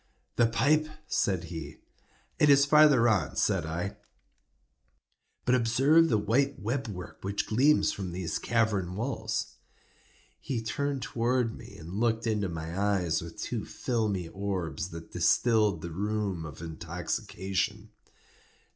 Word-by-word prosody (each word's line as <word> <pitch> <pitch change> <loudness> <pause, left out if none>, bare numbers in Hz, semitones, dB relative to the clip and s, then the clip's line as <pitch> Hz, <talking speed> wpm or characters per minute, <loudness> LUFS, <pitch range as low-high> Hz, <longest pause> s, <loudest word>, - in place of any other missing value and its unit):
"The 120 - +4
pipe," 145 +7 +2 0.2
said 95 -4 0
he. 80 -3 -7 0.6
"It 150 - +5
is 140 0 +7
farther 145 -5 +6
on," 95 - +1
said 80 - +1
I; 90 +6 -3 1.5
"but 125 - +3
observe 135 +7 +4
the 110 - +3
white 135 +7 +1
web 125 +5 -2
work 90 -4 -8
which 100 +1 -2
gleams 135 +7 +3
from 95 -3 -5
these 90 -1 -3
cavern 105 -6 0
walls." 110 -1 -3 0.8
He 130 -4 -3
turned 140 +3 -2
towards 120 0 0
me, 120 +1 -11
and 85 +5 -6
looked 115 -1 +1
into 105 -4 0
my 80 0 -5
eyes 95 -5 +1
with 85 0 -9
two - - -3
filmy 105 -8 -2
orbs 95 -3 -3
that 80 -1 -9
distilled 105 -8 +2
the 85 - -5
rheum 100 -2 -2
of 75 +2 -10
intoxication. 95 +5 -3
105 Hz, 130 wpm, -29 LUFS, 90-120 Hz, 1.5 s, is